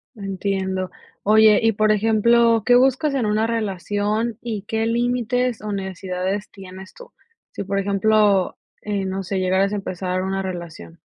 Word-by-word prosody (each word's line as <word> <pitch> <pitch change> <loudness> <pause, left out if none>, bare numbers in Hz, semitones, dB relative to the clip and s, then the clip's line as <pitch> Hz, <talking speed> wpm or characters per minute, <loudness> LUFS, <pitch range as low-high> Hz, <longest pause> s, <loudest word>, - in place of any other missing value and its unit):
Entiendo. 190 -2 -3 0.3
Oye, 215 0 +6
y 225 0 +3
por 215 +1 +2
ejemplo, 225 +1 +3
¿qué 245 - +5
buscas 265 +4 +3
en 255 -4 0
una 215 +1 +1
relación 210 +1 -2
y 225 -4 -4
qué 220 +1 -2
límites, 245 +1 0
o 210 -1 -4
necesidades 190 +1 -4
tienes 190 0 -11
tú? - - -14 0.4
Sí, - - -5
por 195 +1 -1
ejemplo, 200 0 +2 0.2
eh, 205 -2 -2
no 190 +1 -3
sé, 190 +1 -3
llegaras 190 +2 +1
a - - 0
empezar 185 -2 -3
una 195 0 -2
relación. 170 - -7
205 Hz, 150 wpm, -21 LUFS, 190-225 Hz, 0.4 s, Oye